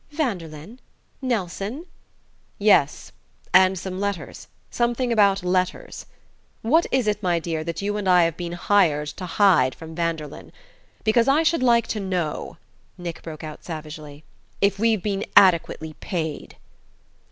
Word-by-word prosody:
"Vanderlyn? 200 - -4 0.4
Nelson?" 225 - -3 0.7
"Yes 200 -9 +2 0.4
and 185 +1 +6
some 185 +1 -5
letters... 200 -2 -4 0.2
something 240 0 0
about 200 -3 +3
letters.... 185 0 -2 0.6
What 315 +10 +3
is 260 -3 +2
it, 210 0 0
my 175 -3 +1
dear, 165 -1 -3
that 170 +3 -5
you 205 +1 -1
and 200 -2 -1
I 180 -1 +6
have 165 -1 0
been 175 -1 -5
hired 175 -5 +2
to 180 +4 -7
hide 175 -8 +3
from 160 0 -10
Vanderlyn? 165 -2 -4 0.5
Because 230 +2 +3
I 290 +4 +4
should 330 -2 +2
like 235 -2 +4
to 215 - -2
know," 180 -6 -3 0.4
Nick 170 -2 -6
broke 155 -2 -9
out 155 -1 -8
savagely, 155 -2 -8 0.4
"if 200 -1 +1
we've 225 -3 +2
been 200 -1 -1
adequately 170 -4 +4
paid." 160 -2 -5
185 Hz, 140 wpm, -23 LUFS, 165-215 Hz, 0.7 s, and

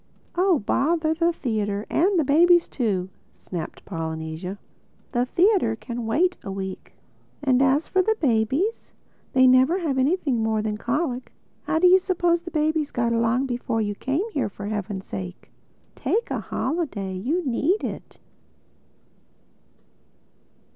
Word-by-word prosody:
"Oh 365 -1 +3
bother 315 +8 +1
the 335 +1 +2
theatre—and 220 - 0
the 320 - +3
babies 340 +5 +5
too," 195 -8 -1 0.3
snapped 170 -4 -7
Polynesia. 160 +2 -5 0.5
"The 245 -1 0
theatre 355 - +3
can 235 0 -6
wait 355 +11 +2
a 205 - -7
week. 190 -1 -6 0.5
And 260 -2 +3
as 275 +3 +3
for 375 - +2 0.2
babies, 270 - 0 0.4
they 260 0 +5
never 260 +7 +5
have 300 -8 -1
anything 275 -4 +1
more 220 -1 0
than 215 -1 -1
colic. 255 +1 -2 0.3
How - - 0
do 345 - +3
you 365 +1 +7
suppose 350 -2 +1
babies 315 -3 0
got 235 -1 0
along 230 +3 +1
before 245 -3 -2
you 205 -2 -1
came 275 - -2
here, 280 - -1
for 200 +1 -8
heaven's 205 -2 -4
sake?—Take 100 - -5
a - - -1
holiday.... 255 - -3
You 295 - -1
need 290 - +1
it." - - -6
260 Hz, 130 wpm, -24 LUFS, 215-335 Hz, 0.5 s, you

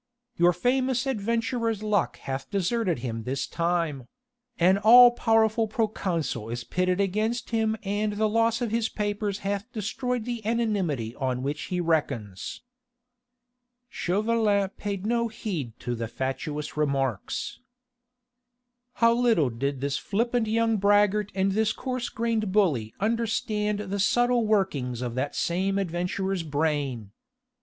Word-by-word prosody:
"Your 175 +1 +5
famous 255 +7 +1
adventurer's 230 -2 -1
luck 210 -3 0
hath 135 0 -5
deserted 200 - 0
him 115 -2 -3
this 130 +4 -2
time: 165 -7 -1 0.5
an 185 +3 +4
all 240 +4 +9
powerful 225 -1 +2
proconsul 185 - -2
is 120 +1 -4
pitted 185 +4 0
against 215 +5 -1
him 220 -1 +1
and 205 +1 -1
the 215 +1 +1
loss 230 +2 +1
of 230 - -2
his 225 -1 0
papers 205 -1 -2
hath 200 +4 -2
destroyed 240 +2 -2
the 240 -2 -3
anonymity 200 - -1
on 130 -2 -1
which 145 +3 -3
he 180 - -2
reckons." 140 - -2 1.3
Chauvelin 205 +1 +1
paid 200 -1 -5
no 235 +1 +1
heed 180 - -5
to 120 - -2
the 115 -1 -3
fatuous 145 +5 -4
remarks. 135 -7 -1 1.3
How 230 -2 +4
little 230 - +3
did 135 +3 -3
this 140 0 -1
flippant 235 +2 0
young 225 0 +2
braggart 205 0 +3
and 195 0 +2
this 220 +2 +1
coarse 255 -2 -3
grained 225 -3 -1
bully 155 - +2
understand 215 -1 0
the 200 -1 -4
subtle 240 +3 +2
workings 140 - 0
of 120 -2 -3
that 130 +3 -2
same 190 +3 0
adventurer's 185 +1 -1
brain! 145 -8 -1
200 Hz, 130 wpm, -26 LUFS, 150-225 Hz, 1.3 s, all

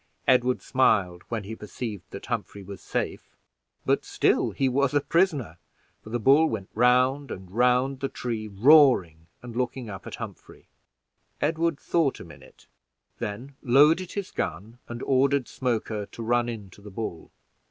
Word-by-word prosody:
Edward 125 0 +3
smiled 100 -9 +2
when 115 -3 -3
he 110 +3 -7
perceived 105 -1 -7
that - - -8
Humphrey 100 - -4
was 100 +1 -9
safe; - - -4 0.5
but - - +2
still - - +1
he 135 - 0
was 140 +2 +1
a - - +6
prisoner, 145 - 0 0.4
for - - -11
the 120 - -1
bull 140 +7 +5
went 100 -4 -5
round 125 +4 +3
and 95 -1 -8
round 125 +4 +2
the 135 0 -2
tree 115 -3 -4
roaring 105 - +4 0.2
and 120 -2 -9
looking 125 -2 -3
up 95 - -9
at - - -6
Humphrey. - - -10 0.7
Edward 165 0 0
thought 160 -6 0
a - - -8
minute, 70 -5 -16 0.5
then 120 +7 -5
loaded 150 +7 +4
his 200 -2 -4
gun, 105 +9 -4
and 120 +1 -6
ordered 135 0 +2
Smoker 110 -4 -2
to 115 +3 -8
run 120 +1 +1
in 105 -5 -7
to 100 - -16
the 105 - -10
bull. 95 -5 -6
120 Hz, 160 wpm, -26 LUFS, 105-135 Hz, 0.7 s, a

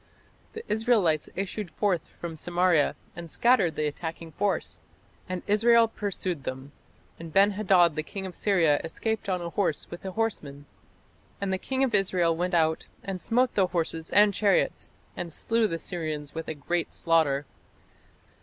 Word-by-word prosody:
The 450 - -7
Israelites 210 -9 +2
issued 195 0 -4
forth 185 -2 0 0.2
from 170 -2 -5
Samaria 175 -1 +2 0.2
and 170 0 -8
scattered 235 -5 +3
the 155 - -1
attacking 160 +2 -5
force. 200 +5 -2 0.5
"And 185 -1 -4
Israel 230 +2 +5
pursued 185 -8 -4
them: 130 +2 -6 0.5
and 165 -1 -8
Ben 200 +4 +5
hadad 190 -5 +3
the 155 - 0
king 190 +5 -7
of 185 - -7
Syria 170 -8 +2
escaped 220 +6 -3
on 180 -1 0
a 170 - -5
horse 180 -7 -1
with 175 - -7
the 190 -1 -6
horseman. 150 -11 -3 0.7
And 195 -1 -1
the 190 - -1
king 265 +4 -1
of 255 -4 0
Israel 180 -4 +2
went 175 +2 -1
out, 160 -1 +1 0.2
and 190 -2 -5
smote 245 +2 +2
the 190 -2 +3
horses 165 -2 -2
and 205 0 +5
chariots, 200 0 +1 0.2
and 170 - -5
slew 225 +7 +1
the 165 -4 -3
Syrians 155 -4 -5
with 165 0 -5
a 160 - -4
great 170 +3 -2
slaughter." 155 -4 +2
180 Hz, 165 wpm, -27 LUFS, 160-205 Hz, 0.7 s, Israel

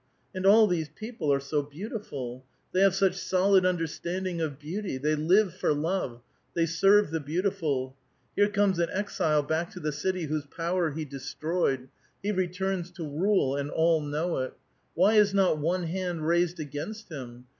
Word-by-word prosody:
And 185 +1 0
all 215 +2 +8
these 170 -6 -1
people 215 -2 -3
are 140 - +3
so 140 +2 -1
beautiful; 145 - -6 0.3
they 185 - +1
have 195 -1 +5
such 195 -1 +3
solid 190 0 +3
undei'standing 175 +1 -2
of 145 -4 -3
beauty; 170 +2 -4
they 150 +4 0
live 175 +5 +3
for 185 -5 0
love; 145 -6 -2 0.3
they 165 - +3
serve 195 +3 +4
the 160 - 0
beautiful. 155 -5 -1 0.4
Here 205 0 +4
comes 200 -3 +2
an 170 - +1
exile 160 -7 +1
back 160 +4 -1
to 180 - -7
the 150 -3 -2
city 180 +5 -2
whose 150 -1 -3
power 170 +2 -1
he 155 +1 -4
de 140 -1 -8
stroved; 140 -3 -1 0.4
he 205 - 0
returns 185 -1 -1
to 170 -3 -6
rule, 155 -2 +1
and 140 0 -2
all 160 0 +3
know 150 +3 -1
it. 130 0 -4 0.4
Why 190 +6 +4
is 205 -1 +5
not 190 -6 +3
one 175 +4 0
hand 175 -1 -3
raised 170 +1 +2
against 155 +10 -6
him 125 -5 -8
170 Hz, 175 wpm, -28 LUFS, 150-190 Hz, 0.4 s, all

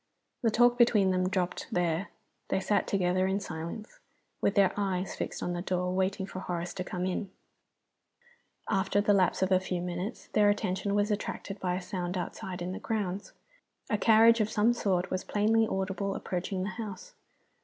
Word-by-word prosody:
The 230 - +3
talk 240 +2 +4
between 210 -5 +5
them 185 0 +1
dropped 185 -2 -2
there. 175 +1 0 0.4
They - - +1
sat 205 +2 +1
together 185 -1 +1
in 190 +1 0
silence, 170 +4 -7 0.4
with 200 - +2
their 195 -2 +4
eyes 190 -2 -1
fixed - - -4
on 175 - -1
the 175 - -3
door, 180 0 -1
waiting 190 +1 0
for 190 - -7
Horace 175 -1 -4
to 185 - -4
come 180 0 -3
in. 185 +2 -2 1.4
After 195 0 +1
the 205 0 +3
lapse 190 -1 +3
of 190 - 0
a 185 - +5
few 185 -1 -3
minutes 180 +5 -5
their 210 -1 +5
attention 200 -1 0
was 205 +1 +2
attracted 200 -1 -4
by 180 -1 -1
a 185 - -3
sound 180 -1 -3
outside 180 0 -5
in 180 - -3
the 185 - -5
grounds. 205 -3 -3 0.6
A 210 - +3
carriage 225 +1 +6
of 215 - +1
some 220 +2 +3
sort 190 -5 0
was 185 - -1
plainly 220 +2 +2
audible 195 0 -2
approaching 185 +1 -3
the 195 - -2
house. 210 -2 -7
190 Hz, 180 wpm, -30 LUFS, 180-205 Hz, 1.4 s, carriage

